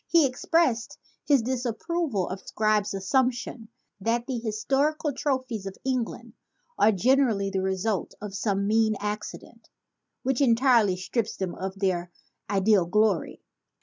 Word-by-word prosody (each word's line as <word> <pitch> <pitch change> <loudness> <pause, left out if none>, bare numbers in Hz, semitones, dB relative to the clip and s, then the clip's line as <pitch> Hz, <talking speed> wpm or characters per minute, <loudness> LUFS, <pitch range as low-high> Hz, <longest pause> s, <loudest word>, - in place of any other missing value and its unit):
He 335 -3 +5
expressed 255 -2 +1 0.3
his 280 -5 +4
disapproval 255 - -1
of 190 +1 -5
Scribe's 215 -2 0
assumption 240 +2 -1 0.3
that 230 +4 0
"the 255 -3 -3
historical 275 +7 0
trophies 255 -7 -2
of 195 - -7
England 255 -3 -3 0.4
are 220 - +5
generally 220 -2 +2
the 190 -1 -1
result 190 +1 -1
of 210 -1 -7
some 200 0 0
mean 220 +1 +2
accident, 210 +1 -6 0.5
which 265 0 0
entirely 235 -6 +4
strips 210 +4 -2
them 185 -2 -3
of 190 +1 -5
their 180 -3 0 0.4
ideal 195 -2 +3
glory." 210 -2 +1
220 Hz, 125 wpm, -26 LUFS, 195-255 Hz, 0.5 s, He